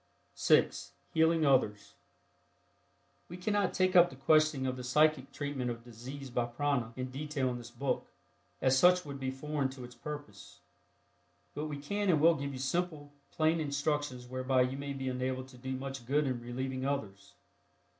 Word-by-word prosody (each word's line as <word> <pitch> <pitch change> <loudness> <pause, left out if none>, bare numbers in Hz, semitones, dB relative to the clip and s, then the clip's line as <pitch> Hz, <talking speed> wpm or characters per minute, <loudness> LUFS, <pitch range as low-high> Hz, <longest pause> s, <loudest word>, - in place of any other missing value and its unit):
(6) - - +2 0.2
HEALING 160 0 +4
OTHERS. 125 -7 +2 1.4
We 175 - -7
cannot 205 +1 +1
take 185 -1 +1
up 175 0 +8
the - - -11
question 155 0 +3
of 130 -1 -1
the 125 - -7
psychic 150 +1 +3
treatment 140 -3 -3
of 115 -1 -5
disease 125 +3 -9
by 120 0 +1
prana 125 -1 -1
in 130 0 -4
detail 140 -1 -2
in 120 -1 -3
this 120 - -10
book, 125 +3 -2 0.6
as 130 0 +5
such 180 +5 +5
would 140 -1 -6
be 130 -1 -2
foreign 140 +1 -2
to 130 -1 -9
its 125 0 -10
purpose. 145 -10 -9 0.9
But 150 +2 -3
we 150 -1 -4
can 200 +8 -2
and 160 -4 +4
will 165 +3 +6
give 140 -2 -4
you 135 - -6
simple, 145 +1 -2 0.2
plain 160 +1 +2
instructions 145 -3 -1
whereby 130 +1 +1
you 130 +1 -2
may 140 0 -4
be 135 -1 -4
enabled 130 0 -2
to 130 - -14
do 130 +1 -4
much 135 -2 -6
good 145 +3 +2
in 125 -3 -2
relieving 130 +2 -4
others. 105 -8 -4
135 Hz, 175 wpm, -32 LUFS, 130-150 Hz, 1.4 s, up